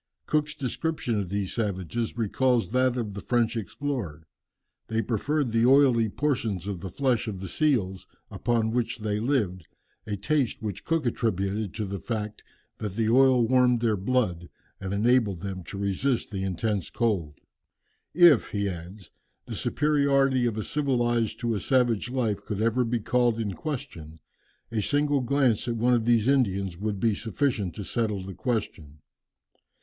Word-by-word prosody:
Cook's 150 0 0
description 135 -4 -2
of 95 -3 -3
these 100 -1 -2
savages 105 +1 -2
recalls 120 +2 +1
that 130 0 +2
of 110 -4 -3
the 100 - -6
French 120 +1 +1
explorer. 110 - -4 0.6
They 110 0 0
preferred 125 +5 -1
the 115 +1 +3
oily 130 -5 +5
portions 115 - -1
of 100 -3 -4
the 95 - -6
flesh 125 0 0
of 100 -4 -4
the 95 - -6
seals 95 - 0 0.2
upon 115 -2 0
which 120 0 -1
they 105 -1 -2
lived 105 - -1 0.4
a 105 - -2
taste 130 +5 0
which 105 -4 -5
Cook 165 -3 0
attributed 105 -3 -1
to 110 - -2
the 100 0 -4
fact 105 +2 -4 0.4
that 105 -4 -4
the 110 0 +1
oil 130 -2 +5
warmed 125 -1 +4
their 115 -3 +2
blood, 95 -5 -1 0.3
and 95 0 -5
enabled 105 -3 +2
them 95 -1 -5
to 100 - -7
resist 100 +7 -1
the 95 -2 -3
intense 95 0 -2
cold. 100 -10 -1 0.8
"If," 170 -7 +6
he 100 -1 -1
adds, 90 +1 -8 0.3
"the - - -7
superiority 140 -4 +2
of 110 -2 -2
a 110 - -2
civilized 120 -6 0
to 120 -1 0
a 105 - -1
savage 120 +1 +1
life 110 -6 -1
could 105 -2 -4
ever 115 +3 +2
be 120 0 -1
called 120 0 +1
in 105 -3 -2
question, 85 - -6 0.5
a 110 -2 0
single 145 +3 +1
glance 125 -3 +1
at 120 - -1
one 120 +2 +2
of 115 -2 +2
these 115 -1 +3
Indians 100 -9 +1
would 100 +2 -3
be 115 0 +2
sufficient 110 - -1
to 105 - -5
settle 105 -2 -1
the 95 0 -7
question. 90 - -3
115 Hz, 165 wpm, -27 LUFS, 100-125 Hz, 0.8 s, If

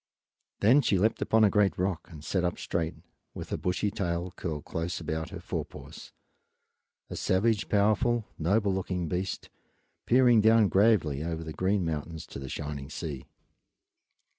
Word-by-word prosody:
Then 120 +8 +6
she 105 -6 +2
leaped 110 +5 +1
upon 110 0 +3
a 105 - +6
great 105 -3 +2
rock 90 -2 -2
and 75 -4 -11
sat 95 +1 -1
up 85 - -1
straight, 85 -1 -2 0.4
with - - -7
her - - -1
bushy 95 +3 -1
tail 90 -2 -2
curled 80 -4 -4
close 85 +2 -3
about 80 -1 -3
her - - -7
fore - - -3
paws, - - -12 1.0
a - - -4
savage, 105 +3 +1
powerful, 110 +3 +2
noble 100 +4 +2
looking 90 -2 -2
beast, 90 +4 -3 0.6
peering 120 -2 +5
down 110 -1 +5
gravely 95 -9 +3
over 80 0 -3
the 80 -1 -6
green 95 +1 0
mountains 80 +1 -4
to - - -9
the 65 -1 -7
shining 70 -1 -5
sea. 70 -5 -6
90 Hz, 160 wpm, -28 LUFS, 80-105 Hz, 1.0 s, Then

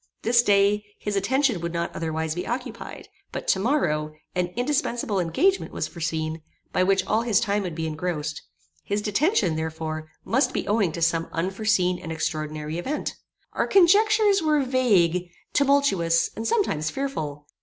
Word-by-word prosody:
This 235 +1 +5
day, 205 -1 +3
his 205 -1 -3
attention 235 - +1
would 170 0 -3
not 170 0 -3
otherwise 160 -1 -2
be 175 +2 -4
occupied; 245 +2 -5 0.2
but - - -6
to 190 - +3
morrow, 155 - 0 0.2
an 180 -1 0
indispensible 240 -5 0
engagement 350 - +1
was - - -3
foreseen, 160 -1 -3 0.3
by - - +2
which 190 0 +2
all 220 +3 +1
his 230 -4 +2
time 205 -2 0
would 180 -4 -4
be 160 0 -3
engrossed: 155 -1 -3 0.4
his 205 +1 -2
detention, 210 - +2
therefore, 160 0 -4 0.2
must 265 +5 +1
be - - -2
owing 205 -4 +2
to 170 - -2
some 165 0 +1
unforeseen 185 0 0
and 165 - -7
extraordinary 155 0 -3
event. 280 +12 -3 0.4
Our - - 0
conjectures 405 +2 +5
were 305 -3 +2
vague, 190 -10 +2 0.2
tumultuous, 275 -13 +3
and 225 +1 -3
sometimes 155 - +1
fearful. 155 - -4
190 Hz, 155 wpm, -25 LUFS, 160-245 Hz, 0.4 s, This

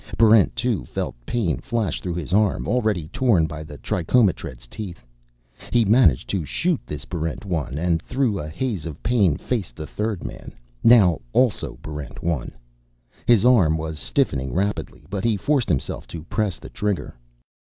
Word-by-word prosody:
Barrent 110 -2 +5
2 115 - 0
felt - - -3
pain 105 -10 0
flash 115 -3 -2
through 90 -2 -3
his 85 0 -4
arm, 105 -1 +2
already 110 -10 0
torn 115 -8 +3
by 75 0 -6
the 75 -1 -10
trichomotred's 85 - 0
teeth. 85 - -8 0.7
He 120 -2 +4
managed 100 - +4
to 95 -4 -1
shoot 170 - 0
this 75 0 -6
Barrent 80 +3 -4
1, 80 -8 -2
and 85 0 +1
through 125 -4 0
a 75 - -5
haze 100 -2 -3
of 75 -2 -9
pain 100 -11 +3
faced 115 -8 -3
the 80 - -6
third 105 +2 -3
man, - - -8 0.3
now 105 -9 +6
also 125 -4 +1
Barrent 75 -3 -7
1. 80 -7 -1 0.8
His 120 -2 +5
arm 95 -11 +5
was 80 0 -4
stiffening 70 - 0
rapidly, 100 +2 -2
but 100 -1 -4
he 115 -3 +2
forced 135 0 +1
himself 75 -7 -2
to 80 -2 -7
press 100 0 -1
the - - -11
trigger.... 105 -9 -2
95 Hz, 165 wpm, -23 LUFS, 80-115 Hz, 0.8 s, now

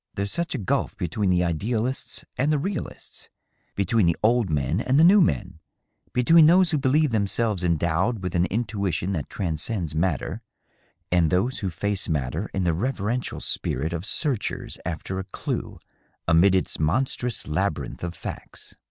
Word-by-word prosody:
There's 100 0 -2
such 170 -3 -2
a - - -1
gulf 100 -7 -1
between 95 +3 -1
the 90 -1 +3
ideal 105 +8 -1
ists 130 +1 -4
and 145 +4 +1
the 150 - +3
realists 185 +3 -6 0.2
— - - -45 0.2
between 100 0 +2
the 85 - +3
old 115 -2 +3
men 75 - 0
and 130 +2 +1
the - - +7
new 195 +4 +7
men 95 - 0 0.3
— - - -41
^between 155 +6 +6
those 180 +1 +5
who 155 - +1
believe 145 +2 +2
themselves 105 -2 0
endowed 85 +6 0
with 90 - -3
an 85 0 +2
intuition 100 -5 -2
that 80 -7 -3
transcends 85 -1 -2
matter, 80 -2 -1 0.7
and 85 -3 +3
those 110 - 0
who 100 - -2
face 100 +3 -2
matter 75 +6 -2
in 95 - -1
the 85 -2 +2
reverential 120 +4 -2
spirit 80 +6 -1
of 85 0 -3
searchers 135 -5 -1
after 90 +2 -4
a - - -3
clue 95 - -5 0.5
amid 85 +4 +5
its 95 - 0
monstrous 120 - 0
labyrinth 75 -5 -2
of 85 0 -4
facts." - - -9
100 Hz, 170 wpm, -25 LUFS, 85-125 Hz, 0.7 s, the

